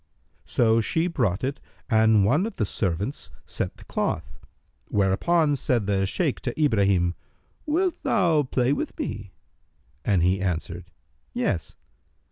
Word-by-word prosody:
So 115 -1 +3
she 160 +9 0
brought 120 - 0
it 135 +1 -2 0.3
and 110 -3 +4
one 150 - +2
of 230 - -8
the 110 - 0
servants 95 - -2 0.2
set - - -4
the - - -14
cloth;[FN#303] - - -3 0.4
whereupon 145 - +2
said 125 -5 0
the 95 -1 +1
Shaykh 150 - -1
to 120 +4 -5
Ibrahim, 100 - +3 0.5
"Wilt 345 +3 0
thou 165 -5 +3
play 130 -1 +1
with - - -4
me?"; - - -5 0.7
and 95 -2 +2
he 95 +2 +2
answered, 90 -1 -3 0.5
"Yes." - - -1
110 Hz, 130 wpm, -25 LUFS, 95-150 Hz, 0.7 s, and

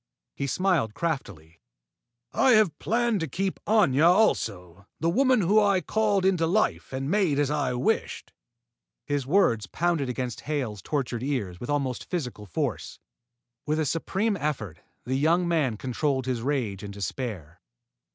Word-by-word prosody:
He 140 - -3
smiled 165 - +1
craftily. 95 - -4 0.7
"I 260 - +4
have 210 -9 +3
planned 235 -1 +1
to 165 - -2
keep 190 +7 -2
Aña 170 -9 +4
also, 100 - +1
the 165 +1 +1
woman 255 +2 +3
whom 205 +4 +4
I 200 -2 +3
called 205 -1 +1
into 180 -4 +2
life 215 +6 0
and 135 +1 -3
made 190 -8 +2
as 145 -1 +1
I 140 -4 0
wished." 125 - -1 0.7
His 145 -3 -2
words 120 - +2
pounded 165 - 0
against 125 -2 -4
Hale's 130 -10 -3
tortured 125 - -2
ears 120 -10 -3
with 120 - -7
almost 140 -4 -2
physical 125 - -4
force. 85 - -3 0.7
With 155 +1 +1
a 155 - +1
supreme 195 +8 0
effort, 115 - -3 0.3
the 130 - -2
young 170 +4 +2
man 150 -10 +1
controlled 130 +2 -1
his 125 -3 -2
rage 120 -8 -2
and 100 - -7
despair. 100 - -5
145 Hz, 150 wpm, -26 LUFS, 120-180 Hz, 0.7 s, I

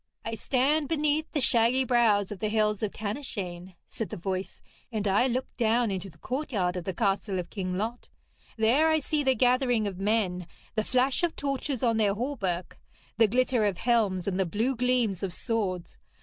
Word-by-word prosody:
'I 225 - -3
stand 275 +6 +1
beneath 305 0 0
the 305 - 0
shaggy 235 +2 +3
brows 225 -6 +3
of 205 - -6
the 215 - -1
Hill 215 -1 +2
of 210 - -7
Tanyshane,' 200 -5 -5
said 220 -6 -5
the 215 - -6
voice, 185 +1 -4 0.3
'and 215 -2 -1
I 205 +6 +3
look 255 +1 -1
down 230 -1 +2
into 195 0 -4
the 155 - -19
courtyard 210 - -2
of 180 -2 -4
the 190 - -2
castle 195 -1 0
of 180 - -5
King 185 -3 -3
Lot. 225 +4 -4 0.5
There 240 +8 +4
I 315 - +4
see 305 0 -1
the 265 -2 +2
gathering 245 -2 +2
of 190 -3 -4
men, 195 -4 0 0.3
the 215 - 0
flash 255 - +1
of 345 -2 0
torches 275 -2 -2
on 230 -2 +3
their 205 -2 +2
hauberks, 205 -8 -3 0.4
the 225 - +7
glitter 250 +1 +2
of 200 -4 +1
helms, 210 -7 +1
and 195 -1 -1
the 190 - +2
blue 225 +10 0
gleams 245 -6 +1
of 190 -3 -3
swords. 185 - -3
220 Hz, 190 wpm, -28 LUFS, 195-255 Hz, 0.5 s, the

